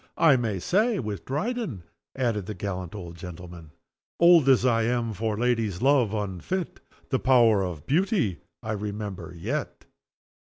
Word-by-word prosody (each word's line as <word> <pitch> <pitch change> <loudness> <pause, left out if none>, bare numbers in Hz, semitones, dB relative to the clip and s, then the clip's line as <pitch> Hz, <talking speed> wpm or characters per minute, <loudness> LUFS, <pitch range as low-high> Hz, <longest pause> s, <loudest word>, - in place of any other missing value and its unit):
"I 160 -5 +6
may 115 -5 -1
say 210 - +1
with 105 -4 -5
Dryden," 155 - -3 0.3
added 115 -7 -1
the 110 - -5
gallant 95 -2 -5
old 85 -4 -8
gentleman: 85 -2 -10 0.5
"'Old 170 -5 +6
as 130 -1 +5
I 115 -2 +3
am, 115 0 0
for 105 +1 -2
ladies' 115 -6 0
love 130 -4 +3
unfit, 105 - -3 0.3
The 130 - +1
power 120 -6 +4
of 85 -5 -5
beauty 165 - +1 0.2
I 110 - -3
remember 105 -2 -5
yet. 125 - -4
110 Hz, 145 wpm, -26 LUFS, 100-135 Hz, 0.5 s, I